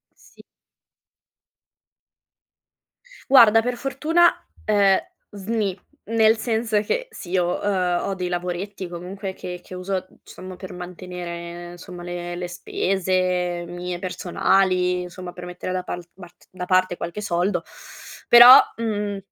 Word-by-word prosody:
Sì. - - -19 2.9
Guarda, 225 -4 +8
per 245 +1 -3
fortuna, 305 +7 +3 0.4
ehm, 200 -2 +4 0.3
sni, 205 -2 -3 0.3
nel 225 0 +4
senso 220 -2 0
che, - - -2
sì, 185 0 -4
ho 175 0 0
uhm, 180 -3 0
ho - - -1
dei 185 -1 -3
lavoretti 180 +2 -4
comunque 185 +3 -6
che 180 -1 -8
che - - -12
uso, 185 +2 -5 0.2
uhm, - - -23
diciamo 185 0 -10
per 185 -1 -9
mantenere, 175 -1 -8
somma, 175 0 -10
le 175 0 -5
le 175 0 -5
spese 180 -1 -1
mie 175 0 -5
personali, 180 0 +1
insomma, 180 0 -8
per 180 0 -9
mettere 180 +1 -6
da 185 0 -1
pal 175 -1 -6
bart 180 -2 -16
da 185 -1 -6
parte 185 -1 +2
qualche 175 +5 -5
soldo. 185 0 0 0.6
Però, 240 +3 +11 0.2
mhmm, 210 -3 -2
185 Hz, 125 wpm, -23 LUFS, 180-205 Hz, 2.9 s, Però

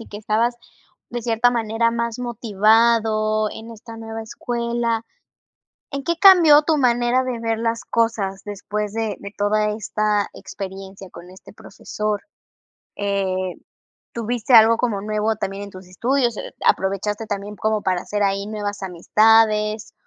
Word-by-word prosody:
y 230 - -10
que 205 - -9
estabas 225 +3 0 0.5
de 240 -1 -5
cierta 230 +1 +2
manera 230 -1 0
más 235 0 -3
motivado 220 -1 +2
en 225 +1 -10
esta 230 0 -11
nueva 225 0 -7
escuela, 235 0 -2 0.9
¿en 275 0 -4
qué 340 +1 -1
cambió 340 -7 +8
tu 315 0 +1
manera 245 -1 +2
de 250 -2 -4
ver 225 -1 -1
las 230 0 -2
cosas 210 -4 -1
después 205 0 -4
de 225 -2 -2
de 200 - -8
toda 210 +1 +1
esta 210 -1 -1
experiencia 195 -1 -9
con 180 +1 -13
este 185 0 -15
profesor? 210 0 -5 0.8
Eh, 190 -2 -1 0.6
¿tuviste 235 +1 -2
algo 225 +1 +7
como 220 -5 -1
nuevo 215 +1 -1
también 195 -1 -5
en 200 - -8
tus 185 -1 -13
estudios? 240 +5 0
E - - -8
¿Aprovechaste 200 +3 0
también 205 0 -5
como 215 -1 -1
para 185 -1 0
hacer 205 +1 -2
ahí 200 0 0
nuevas 205 -1 -4
amistades? 215 +3 +2
215 Hz, 145 wpm, -21 LUFS, 205-235 Hz, 0.9 s, cambió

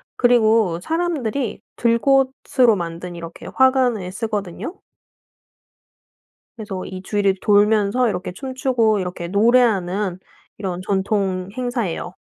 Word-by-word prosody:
그리고 220 -7 +3
사람들이 285 - -2
들꽃으로 255 0 +2
만든 175 0 -6
이렇게 170 0 -9
화관을 255 -8 +2
쓰거든요. 210 - -4 1.8
그래서 205 -5 -6
이 185 0 -7
주위를 200 -1 +1
돌면서 210 +3 +3
이렇게 180 -3 -4
춤추고 255 -2 0
이렇게 180 -2 -4
노래하는 200 -3 +2 0.4
이런 185 -3 -4
전통 190 -1 -1
행사에요. 235 -8 -3
210 Hz, 265 characters per minute, -21 LUFS, 185-245 Hz, 1.8 s, 그리고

